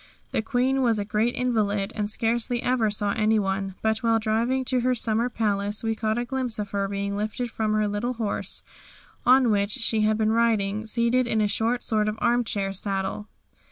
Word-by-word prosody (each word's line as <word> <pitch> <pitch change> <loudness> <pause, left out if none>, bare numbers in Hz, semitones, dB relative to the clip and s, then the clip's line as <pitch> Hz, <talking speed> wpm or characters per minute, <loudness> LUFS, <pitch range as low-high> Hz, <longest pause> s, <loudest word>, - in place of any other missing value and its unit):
The - - 0
Queen 260 +3 +1
was 235 -3 +2
a 205 - -2
great 215 +3 0
invalid 210 -5 0
and 210 -1 -1
scarcely 235 +2 0
ever 245 -3 +2
saw 205 0 -1
anyone, 195 -3 0
but 220 0 +1
while 230 -1 +2
driving 230 +4 0
to 255 0 +1
her 250 +1 +1
summer 230 +1 0
palace 205 -2 -1
we 225 0 0
caught 220 0 -1
a 240 - -1
glimpse 255 -2 -2
of 205 -1 -4
her 200 -1 -1
being 200 0 -3
lifted 215 +3 -3
from 215 -1 -1
her 215 0 +2
little 205 +5 -2
horse, 225 -4 -2 0.6
on 255 -2 +6
which 200 -1 +1
she 225 -3 +1
had 215 0 +2
been 220 0 +2
riding, 220 -2 +1
seated 235 +3 +1
in 220 -2 +1
a 210 - +3
sort 220 0 0
of 215 - -4
armchair 225 -5 0
saddle. 195 +1 -3
220 Hz, 190 wpm, -25 LUFS, 205-240 Hz, 0.6 s, on